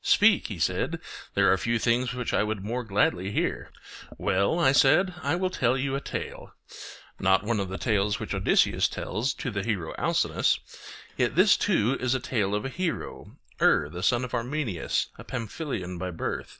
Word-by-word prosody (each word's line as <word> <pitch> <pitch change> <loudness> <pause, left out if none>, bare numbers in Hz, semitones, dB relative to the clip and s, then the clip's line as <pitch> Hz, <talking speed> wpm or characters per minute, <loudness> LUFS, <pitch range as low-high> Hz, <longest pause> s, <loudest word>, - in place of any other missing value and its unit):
Speak, 210 -2 +4
he 105 - -6
said; 85 - -1 0.4
there - - +5
are - - +2
few 115 +1 0
things 120 +2 +1
which 125 -1 -3
I - - +3
would 105 -2 -2
more 120 +3 -2
gladly 100 -3 +1
hear. - - -2 0.5
Well, 100 - +1
I 150 -6 +4
said, 145 +7 +4
I 145 +3 0
will 185 +1 -1
tell 125 -5 +1
you 135 +1 -1
a 140 - -2
tale; - - -6 0.6
not 95 +1 +3
one 110 0 0
of 95 -2 -2
the 95 - -4
tales 105 -3 0
which - - -4
Odysseus - - +3
tells 120 +5 -2
to 125 - -4
the 100 -2 -2
hero 95 -6 -2
Alcinous, - - +1 0.6
yet - - +1
this - - +6
too 120 +6 +1
is 125 0 +1
a - - 0
tale 105 -5 -1
of 105 - -2
a - - -2
hero, 180 +3 -4 0.2
Er 70 - +4
the 85 +4 -7
son 120 +7 +2
of 125 - -9
Armenius, 120 - -1
a - - -8
Pamphylian 115 - -5
by 90 0 -3
birth. 80 - -4
115 Hz, 190 wpm, -27 LUFS, 100-135 Hz, 0.6 s, this